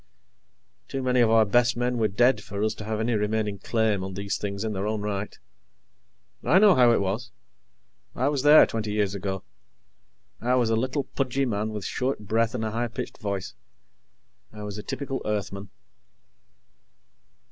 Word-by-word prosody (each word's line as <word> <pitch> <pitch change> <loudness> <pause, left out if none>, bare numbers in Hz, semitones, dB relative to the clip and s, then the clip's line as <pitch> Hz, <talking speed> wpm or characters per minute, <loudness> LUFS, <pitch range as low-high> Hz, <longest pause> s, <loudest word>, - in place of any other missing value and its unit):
Too 135 - -4
many 125 -1 +3
of 115 - +4
our 110 -1 +5
best 120 +3 +2
men 125 0 0
were 110 - +3
dead 120 +6 +3
for 100 +1 -4
us 110 0 +1
to 110 - -9
have 110 0 -2
any 115 +2 0
remaining 105 -1 -1
claim 110 -4 0
on 95 0 -6
these 100 +1 -2
things 100 0 -4
in 110 -2 -2
our 95 +2 -2
own 110 -1 -2
right. 105 0 -4 1.1
I 175 - +4
know 205 0 +7
how 125 -5 +5
it 115 - +2
was. 105 +6 -2 0.9
I 130 - +1
was 145 -2 0
there, 150 +2 +8
twenty 110 -2 -3
years 105 -2 0
ago. 95 -1 -4 1.0
I 125 +2 +1
was 120 -3 +2
a - - +3
little, 130 +5 -1
pudgy 135 0 -1
man 110 -2 -1
with 105 -3 -5
short 130 +1 -2
breath 115 +3 0
and 110 -2 -2
a 110 - -2
high 120 +2 -1
pitched 115 - -7
voice. 100 -4 -4 1.0
I 105 -1 -9
was 105 0 -6
a - - -7
typical 135 -2 -4
Earthman. 100 -2 -3
110 Hz, 180 wpm, -26 LUFS, 105-125 Hz, 1.1 s, there